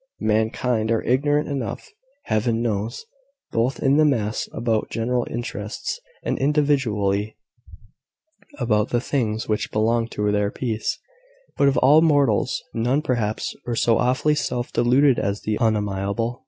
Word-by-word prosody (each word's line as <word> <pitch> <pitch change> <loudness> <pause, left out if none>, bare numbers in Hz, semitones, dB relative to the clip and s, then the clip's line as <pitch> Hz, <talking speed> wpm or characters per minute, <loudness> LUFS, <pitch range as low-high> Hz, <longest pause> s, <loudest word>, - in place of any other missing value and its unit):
Mankind 110 +1 0
are 115 -1 +1
ignorant 145 +4 +1
enough, 140 - -4 0.3
Heaven 115 +1 0
knows, 110 - -2 0.5
both 120 +4 0
in 140 +1 +3
the 155 - +5
mass, 115 -8 0
about 115 -2 -1
general 120 +1 -1
interests, 120 - -4 0.2
and - - -2
individually, 120 -9 +1 1.2
about 105 -2 +1
the 120 - +1
things 115 -4 -2
which 105 -1 -1
belong 115 +2 +1
to 105 -2 -1
their 105 0 +1
peace: 115 - -3 0.6
but 140 - +3
of 140 - +2
all 145 +4 +6
mortals, 145 -9 +2
none 125 +6 0
perhaps 115 -6 -2
are 120 - -1
so 115 0 +2
awfully 130 +4 +2
self 125 -4 -2
deluded 130 +3 +4
as 100 +1 -2
the 110 - -1
unamiable. 105 +2 -1
115 Hz, 135 wpm, -23 LUFS, 110-135 Hz, 1.2 s, all